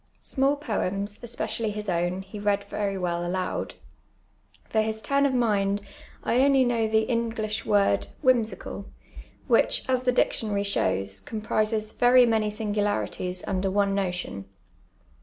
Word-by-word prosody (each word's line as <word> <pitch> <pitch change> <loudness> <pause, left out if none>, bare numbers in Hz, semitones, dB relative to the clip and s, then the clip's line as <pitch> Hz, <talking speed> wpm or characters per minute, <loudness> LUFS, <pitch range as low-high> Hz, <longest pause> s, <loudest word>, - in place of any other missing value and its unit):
Small 275 +2 +1
poems, 205 -6 -3
es])eeially 230 -2 -2
his 210 0 -5
owu, 175 +1 -1
he 195 +2 -9
read 205 -1 +1
very 200 -1 -3
will 175 -2 -1
aloud. 185 +1 -2 0.9
For 220 - +2
his 220 0 -1
tiun 280 +6 +2
of 270 - -1
mind 205 -4 +1 0.4
I 240 - +2
only 275 -2 +4
know 230 -2 +1
the 220 0 +2
English 225 -2 -2
word 200 -1 +3
*• - - -6 0.2
whimsical," 225 -5 0 0.6
which, - - +3
as 255 -1 +1
the 255 0 +2
dietion; 215 -4 +1
ir}' 200 - +1
shows, 95 - -1
comprises 215 - -1
very 245 +1 +5
many 220 -2 +1
sini^ularities 205 -4 -2
under 195 0 -1
oiu' 200 0 +1
noti(Mi. 180 - -3
210 Hz, 140 wpm, -26 LUFS, 195-230 Hz, 0.9 s, very